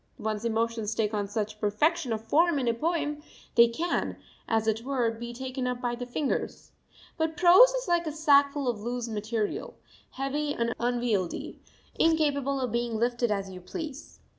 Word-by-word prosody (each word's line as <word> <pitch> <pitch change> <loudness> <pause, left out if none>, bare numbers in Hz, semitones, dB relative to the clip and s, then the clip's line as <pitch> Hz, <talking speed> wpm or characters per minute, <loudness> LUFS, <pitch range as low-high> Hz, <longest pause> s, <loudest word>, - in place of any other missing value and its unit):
One's 215 0 -3
emotions 225 -1 -1
take 215 -1 0
on 205 -1 -1
such 210 +1 -3
perfection 270 +8 +1
of 220 -1 -2
form 335 +3 +3
in 260 -3 -1
a 235 - +3
poem; 300 +2 -1 0.3
they 235 0 +7
can, 325 +10 -2 0.3
as 225 -1 +1
it 220 0 0
were, 250 -3 0
be 235 +1 -7
taken 255 +1 -4
up 250 -1 -2
by 245 -1 -1
the 245 +1 -5
fingers. 265 +3 -3 0.5
But 320 0 -1
prose 360 +8 +8
is - - -3
like 345 -1 +1
a - - -1
sackful 285 -2 +3
of 235 -4 -1
loose 240 +1 -3
material, 215 0 -3 0.4
heavy 290 +2 -2
and 235 0 0
unwieldy, 235 -6 -1 0.4
incapable 285 -4 +2
of 250 -3 -2
being 235 -1 -1
lifted 240 +1 +1
as 195 -2 -2
you 185 -1 -9
please. 300 - -7
245 Hz, 170 wpm, -28 LUFS, 225-295 Hz, 0.5 s, prose